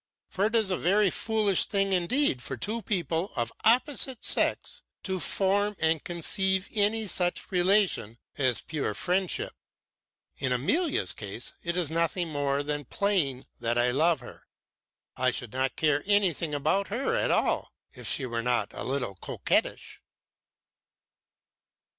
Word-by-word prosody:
For 200 Hz, +3 st, +1 dB
it 225 Hz, -, -3 dB
is 220 Hz, -4 st, +2 dB
a 185 Hz, -, 0 dB
very 195 Hz, +2 st, +3 dB
foolish 215 Hz, -4 st, +1 dB
thing 195 Hz, -1 st, 0 dB
indeed 180 Hz, -, +2 dB
for 130 Hz, -, -5 dB
two 220 Hz, -, -1 dB
people 180 Hz, -2 st, -2 dB
of 115 Hz, -1 st, -2 dB
opposite 255 Hz, +1 st, +2 dB
sex -, -, 0 dB, 0.2 s
to 190 Hz, -1 st, -2 dB
form 205 Hz, +3 st, +1 dB
and 160 Hz, -1 st, +1 dB
conceive 190 Hz, +2 st, 0 dB
any 215 Hz, +1 st, +1 dB
such 180 Hz, -1 st, -1 dB
relation 180 Hz, -, +2 dB, 0.2 s
as 130 Hz, -4 st, +1 dB
pure 145 Hz, -9 st, -3 dB
friendship. 185 Hz, 0 st, 0 dB, 0.9 s
In 130 Hz, -2 st, -1 dB
Amalia's 295 Hz, -, +1 dB
case -, -, -7 dB
it 170 Hz, +1 st, -2 dB
is 165 Hz, -4 st, 0 dB
nothing 170 Hz, +1 st, 0 dB
more 145 Hz, -1 st, -1 dB
than 145 Hz, 0 st, -3 dB
playing 160 Hz, -9 st, 0 dB
that 120 Hz, 0 st, 0 dB
I 120 Hz, +1 st, +3 dB
love 160 Hz, +5 st, +2 dB
her. -, -, -13 dB, 0.7 s
I 130 Hz, 0 st, +2 dB
should 120 Hz, -2 st, -5 dB
not 130 Hz, 0 st, -1 dB
care 150 Hz, -2 st, +1 dB
anything 180 Hz, -7 st, +2 dB
about 195 Hz, +7 st, +1 dB
her 265 Hz, -, -1 dB
at -, -, +1 dB
all, -, -, +1 dB, 0.2 s
if -, -, -8 dB
she 135 Hz, -, +2 dB
were 115 Hz, -2 st, -2 dB
not 120 Hz, 0 st, 0 dB
a -, -, -6 dB
little 130 Hz, -6 st, -2 dB
coquettish. 95 Hz, -, -2 dB
175 Hz, 145 wpm, -27 LUFS, 140-200 Hz, 0.9 s, very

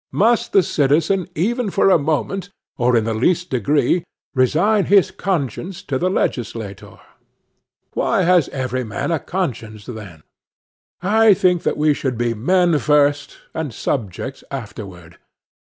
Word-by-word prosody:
Must 230 Hz, +3 st, +2 dB
the 195 Hz, -, +5 dB
citizen 160 Hz, +6 st, +1 dB
ever 230 Hz, +7 st, 0 dB
for 195 Hz, -, +3 dB
a 170 Hz, -, +5 dB
moment, 160 Hz, +6 st, -2 dB, 0.3 s
or 120 Hz, -1 st, +2 dB
in 115 Hz, -, +2 dB
the 115 Hz, +1 st, -1 dB
least 175 Hz, +10 st, 0 dB
degree, 145 Hz, -, +1 dB, 0.3 s
resign 170 Hz, -, +2 dB
his 200 Hz, -1 st, +4 dB
conscience 175 Hz, -, -3 dB
to 130 Hz, -2 st, -2 dB
the 180 Hz, -, +1 dB
legislator? 115 Hz, -, -3 dB, 1.0 s
Why -, -, +1 dB
has 175 Hz, -3 st, +3 dB
every 130 Hz, -1 st, -3 dB
man 110 Hz, +8 st, -3 dB
a 165 Hz, -, +1 dB
conscience, 115 Hz, -, -4 dB
then? 100 Hz, -10 st, -9 dB, 0.8 s
I 215 Hz, +1 st, +5 dB
think 180 Hz, -2 st, +2 dB
that -, -, -1 dB
we 150 Hz, 0 st, +3 dB
should 130 Hz, -4 st, -3 dB
be 120 Hz, 0 st, 0 dB
men 170 Hz, -, +2 dB
first, 145 Hz, -1 st, +1 dB, 0.2 s
and 160 Hz, -4 st, -3 dB
subjects 115 Hz, +3 st, -4 dB
afterward. 100 Hz, -9 st, -8 dB
145 Hz, 140 wpm, -20 LUFS, 120-180 Hz, 1.0 s, the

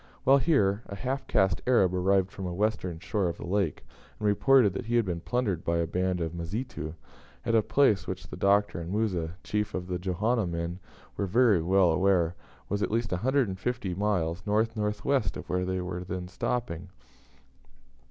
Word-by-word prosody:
While 135 Hz, +1 st, +6 dB
here, 105 Hz, -10 st, +2 dB
a 100 Hz, -, -6 dB
half 130 Hz, +6 st, -3 dB
caste 95 Hz, -6 st, +2 dB
Arab 100 Hz, -8 st, +4 dB
arrived 95 Hz, +1 st, +2 dB
from 95 Hz, -, -6 dB
the 90 Hz, -, -3 dB
western 95 Hz, -3 st, -1 dB
shore 95 Hz, +2 st, -1 dB
of 85 Hz, -, -5 dB
the -, -, -7 dB
lake, 95 Hz, -3 st, -1 dB, 0.3 s
and 105 Hz, -, -1 dB
reported 115 Hz, 0 st, +4 dB
that 110 Hz, +4 st, -5 dB
he 120 Hz, -, 0 dB
had 120 Hz, -2 st, +3 dB
been 85 Hz, -3 st, -3 dB
plundered 110 Hz, -8 st, -1 dB
by 85 Hz, 0 st, 0 dB
a 85 Hz, -, +1 dB
band 90 Hz, +1 st, -1 dB
of 80 Hz, -1 st, -2 dB
Mazitu, 85 Hz, -1 st, -5 dB, 0.5 s
at 115 Hz, -, 0 dB
a 115 Hz, -, +5 dB
place 110 Hz, -3 st, +2 dB
which -, -, -5 dB
the -, -, -8 dB
Doctor 100 Hz, -2 st, +2 dB
and 85 Hz, +2 st, -6 dB
Musa, 90 Hz, -6 st, -1 dB
chief 105 Hz, 0 st, -2 dB
of 90 Hz, -, -3 dB
the 90 Hz, -1 st, -3 dB
Johanna 100 Hz, +4 st, 0 dB
men, 85 Hz, +1 st, -3 dB, 0.4 s
were 100 Hz, -, -1 dB
very 110 Hz, -2 st, +4 dB
well 90 Hz, +1 st, +4 dB
aware 90 Hz, -1 st, +2 dB, 0.3 s
was 100 Hz, +1 st, -2 dB
at -, -, +1 dB
least 115 Hz, +1 st, -1 dB
150 115 Hz, -1 st, 0 dB
miles 90 Hz, -4 st, 0 dB
north 110 Hz, +2 st, +1 dB
north 105 Hz, -1 st, -2 dB
west 135 Hz, -, +1 dB
of -, -, -8 dB
where 90 Hz, 0 st, 0 dB
they 95 Hz, 0 st, -1 dB
were 90 Hz, 0 st, -4 dB
then 90 Hz, 0 st, -5 dB
stopping. 95 Hz, -3 st, -3 dB
95 Hz, 190 wpm, -28 LUFS, 90-110 Hz, 0.5 s, While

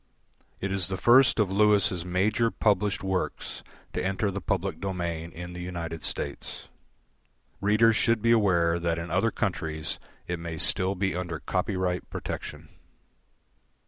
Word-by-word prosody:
It 95 Hz, -, -2 dB
is 95 Hz, -3 st, 0 dB
the 95 Hz, 0 st, -3 dB
first 120 Hz, +7 st, +6 dB
of 100 Hz, -3 st, +2 dB
Lewis' 100 Hz, -3 st, +3 dB
major 100 Hz, +6 st, +1 dB
published 105 Hz, -2 st, +1 dB
works 95 Hz, -1 st, -2 dB, 0.3 s
to -, -, -2 dB
enter 95 Hz, +2 st, 0 dB
the 100 Hz, +1 st, -4 dB
public 95 Hz, 0 st, -1 dB
domain 85 Hz, -4 st, -3 dB
in 90 Hz, +2 st, -8 dB
the 90 Hz, -, -7 dB
United 85 Hz, -2 st, -5 dB
States. 70 Hz, -1 st, -5 dB, 0.9 s
Readers 110 Hz, +2 st, +4 dB
should 115 Hz, -1 st, +2 dB
be 115 Hz, +2 st, +2 dB
aware 85 Hz, -7 st, +3 dB
that 85 Hz, -1 st, 0 dB
in 85 Hz, 0 st, -5 dB
other -, -, +3 dB
countries 80 Hz, 0 st, -2 dB, 0.3 s
it 90 Hz, -1 st, -3 dB
may 85 Hz, -1 st, -5 dB
still 95 Hz, +4 st, +3 dB
be 95 Hz, 0 st, 0 dB
under 90 Hz, -2 st, -3 dB
copyright 90 Hz, -1 st, -1 dB
protection. -, -, -6 dB
95 Hz, 145 wpm, -27 LUFS, 85-100 Hz, 0.9 s, first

